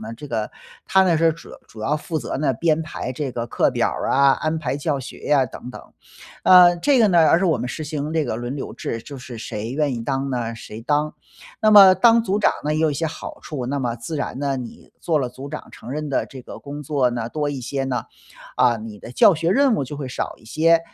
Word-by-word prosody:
呢， 110 +1 -7
这 145 +5 -10
个 110 -2 -2 0.3
他 190 0 +4
呢， 170 -3 +3
是 165 0 +3
主 165 - -14
要 - - -12
主 110 - -12
要 145 +7 0
负 160 +1 -4
责 - - -4
呢， 145 -3 +1
编 160 +4 +1
排 140 -5 -5
这 135 +1 -3
个 120 -1 -4
课 - - +1
表 - - +1
儿 - - -3
啊、 140 0 +5
安 155 +3 -1
排 135 -3 -2
教 145 -1 -1
学 130 - -10
呀 140 -3 +3
等 125 +2 -9
等。 - - -9 0.6
呃， 180 -1 +7
这 275 +7 +3
个 220 - +5
呢 175 -3 +4
而 165 - +5
是 195 - 0
我 165 - +3
们 125 - -4
实 155 +4 -5
行 150 0 -4
这 160 -2 +1
个 120 - -3
轮 120 +4 -4
流 - - -6
制， 115 - -5
就 140 -2 -9
是 125 -1 -9
谁 110 +1 -5
愿 145 -1 0
意 115 - -5
当 135 0 -2
呢， 115 -2 -2
谁 115 -1 -9
当。 150 +4 0 0.5
那 215 - +4
么 195 -3 +9
当 230 +4 +5
组 205 -1 0
长 - - +3
呢， 150 - 0
也 - - 0
有 160 -1 +3
一 - - -3
些 165 - -2
好 160 - -8
处， 130 -5 -5
那 140 +2 -2
么 120 -2 -1
自 120 +7 -5
然 140 - -4
呢， 140 -1 -1
你 125 -2 -9
做 160 -3 +1
了 130 -3 -1
组 135 +3 -9
长 155 - -7
承 125 - -10
认 150 +1 -3
的 135 - 0
这 130 - -10
个 - - -10
工 145 +1 -7
作 140 -3 +1
呢， 120 -1 -3
多 145 +3 -2
一 140 -2 -5
些 135 +2 -3
呢， 130 -2 -2 0.5
啊， 120 -2 +4
你 110 -1 -9
的 - - -10
教 175 - +6
学 165 +2 0
任 270 +3 +4
务 140 - -1
就 145 +3 -7
会 140 -2 -5
少 - - -4
一 - - -22
些， 165 +7 +3
145 Hz, 280 characters per minute, -22 LUFS, 125-160 Hz, 0.6 s, 么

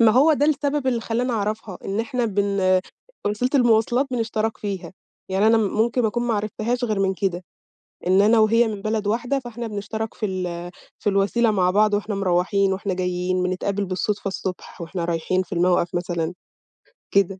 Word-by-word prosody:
ما 230 -1 +7
هو 285 +7 +5
ده 290 0 +2
السبب 290 -2 0
اللي 245 -3 +1
خلّاني 240 +2 -1
أعرفها، 210 -2 -3
إن 200 +3 -1
إحنا 245 +1 -1
بن 200 -2 +2 0.5
وسيلة 210 +5 0
المواصلات 240 +1 +3
بنشترك 225 -2 -1
فيها. 195 -3 -5 0.4
يعني 195 +3 +2
أنا 225 0 +5
ممكن 225 +3 +1
أكون 240 +3 -1
ما 240 -2 0
عرفتهاش 215 +4 -1
غير 215 -4 0
من 195 0 +1
كده، 185 -2 -2 0.6
إن 190 +2 +5
أنا 220 +2 +5
وهي 225 +2 +4
من 210 -2 -5
بلد 215 -1 -1
واحدة، 245 +6 0
فإحنا 240 -2 -6
بنشترك 220 +1 -4
في 215 - -2
ال 175 -2 -4 0.3
في 210 - -1
الوسيلة 205 +4 +2
مع 185 -3 +2
بعض 210 +2 +3
وإحنا 205 +1 -1
مروّحين 195 +1 +1
وإحنا 195 0 -2
جايين، 180 0 -1
بنتقابل 195 +2 -1
بالصدفة 195 +2 -2
الصبح 190 -2 -6
وإحنا 170 +1 -4
رايحين 170 +2 0
في 185 - -16
الموقَف 175 0 +2
مثلًا، 175 -1 -2 0.8
كده. 195 -1 +2
205 Hz, 175 wpm, -23 LUFS, 185-230 Hz, 0.8 s, ما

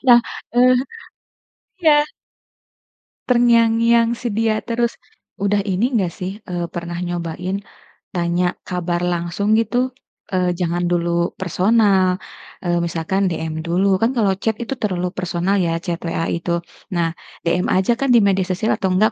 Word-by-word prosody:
Nah, 240 -1 +9 0.4
eh 250 +1 +6 1.1
iya. 315 - +6 1.4
Terngiang-ngiang 230 -1 +4
si 245 - -4
dia 220 0 +1
terus. 235 0 -1 0.4
Udah 200 +1 +1
ini 195 +2 0
nggak 195 -6 +2
sih, 185 +1 -3 0.2
eee, 175 -1 -2
pernah 170 0 -4
nyobain, 175 +3 -3 0.5
tanya 175 0 0
kabar 175 -1 -2
langsung 175 +5 0
gitu? 230 +2 0 0.6
Eee, 180 -1 +2
jangan 175 0 0
dulu 170 0 +1
personal, 190 0 +3 0.5
eee, 175 0 +1
misalkan 170 +3 -1
DM 160 -1 -3
dulu 180 +4 +1
kan 225 +2 +3
kalau 205 -4 +3
chat 220 -1 0
itu 235 - -3
terlalu 180 -4 -1
personal 180 +2 0
ya 165 -1 0
chat 170 -2 -2
WA 165 0 -1
itu, 170 +1 -2 0.4
nah 170 -1 +1 0.4
DM 175 +2 +1
aja 190 +5 +3
kan 275 - 0
di - - +8
media 190 -1 +2
sosial 190 +4 0
atau 190 - 0
enggak 215 +4 +3
185 Hz, 140 wpm, -20 LUFS, 175-220 Hz, 1.4 s, Nah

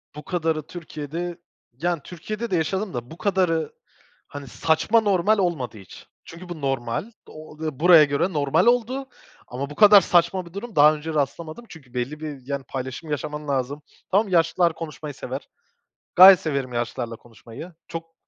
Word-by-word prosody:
Bu 150 - -8
kadarı 160 -4 -2
Türkiye'de 170 +1 -6 0.4
yani 175 -3 0
Türkiye'de 215 +6 -6
de - - +2
yaşadım 190 +3 -1
da 120 +3 -6
bu 165 - -10
kadarı, 175 -6 0 0.6
hani, 145 -1 -9
saçma 165 - +2
normal 205 +1 +2
olmadı 155 - -2
hiç. 95 - -14 0.2
Çünkü 175 +2 -11
bu 160 -4 -7
normal 135 - -2 0.2
o 155 0 -12
ve 155 -4 -4
buraya 170 -2 +8
göre 145 +6 0
normal 150 +6 +2
oldu 250 +3 +1 0.4
ama 135 +3 -5
bu 145 - -9
kadar 205 +1 +8
saçma 175 +1 +2
bir 170 - -15
durum 220 +2 -7
daha 150 +1 +6
önce 155 +1 -6
rastlamadım 155 - -3
çünkü 135 -7 -14
belli 130 +5 -3
bir 150 -4 -7
yani 140 -1 -3
paylaşım 130 +4 -6
yaşaman 150 0 -4
lazım. 140 +2 -2 0.3
Tamam, 205 +3 +3
yaşlılar 170 0 +2
konuşmayı 155 -2 -7
sever. - - -7 0.7
Gayet 185 0 +10
severim 140 -5 -3
yaşlılarla 120 0 -3
konuşmayı. 120 +9 -12
Çok 165 0 -8
160 Hz, 160 wpm, -23 LUFS, 140-180 Hz, 0.7 s, Gayet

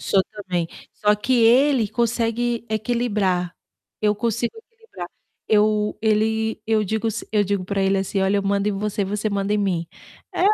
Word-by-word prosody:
sou 195 -1 +2
também, 180 -5 -2 0.2
só 210 0 +2
que 210 +5 0
ele 245 +1 +5
consegue 235 +1 0
equilibrar, 210 -6 0 0.5
eu 210 -1 +2
consigo 235 - -2
equilibrar. 450 - -11 0.4
Eu 210 0 +2
ele 220 0 +1
eu 220 -1 +2
digo 220 +3 -1
s 220 - -4
eu 210 -1 +2
digo 200 -1 -1
para 195 +1 -1
ele 195 0 +2
assim: 195 0 -1
"Olha, 190 +1 +2
eu - - -1
mando 200 +1 +1
em - - -2
você 205 +1 -2
e - - 0
você 210 +2 -2
manda 200 0 -1
em 210 - +2
mim." 180 -5 0 0.5
É - - -2
210 Hz, 175 wpm, -22 LUFS, 195-225 Hz, 0.5 s, ele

